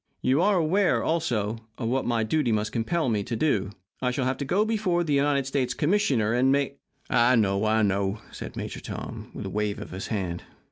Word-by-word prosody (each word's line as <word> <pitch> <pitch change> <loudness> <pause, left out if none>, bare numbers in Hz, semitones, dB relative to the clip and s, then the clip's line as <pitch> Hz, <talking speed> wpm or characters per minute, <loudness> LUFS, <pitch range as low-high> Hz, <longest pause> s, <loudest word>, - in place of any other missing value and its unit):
You 130 +5 +3
are 200 +1 +3
aware, 180 +4 +2
also, 115 -10 0 0.2
of 115 - -3
what 130 +3 0
my 115 -2 +1
duty 130 +2 +1
must 110 0 0
compel 155 +7 0
me 105 -4 +1
to 115 - -3
do. 110 -7 +1 0.3
I 125 - +1
shall 125 +1 -1
have 130 0 -1
to 140 - -2
go 195 +9 +2
before 205 -6 +1
the 150 -3 -1
United 140 -1 +2
States 130 -2 -1
Commissioner 145 - +2
and 130 +2 +3
make 140 0 0 0.2
" - - -33
"I 125 +1 +5
know, 100 -2 +2
I 110 0 +3
know," 100 +1 0
said - - -8
Major - - -5
Tom, - - -7
with - - -5
a - - -3
wave 105 0 -1
of 105 - -8
his 95 +1 -5
hand. 90 -6 -3
125 Hz, 220 wpm, -26 LUFS, 110-150 Hz, 0.3 s, I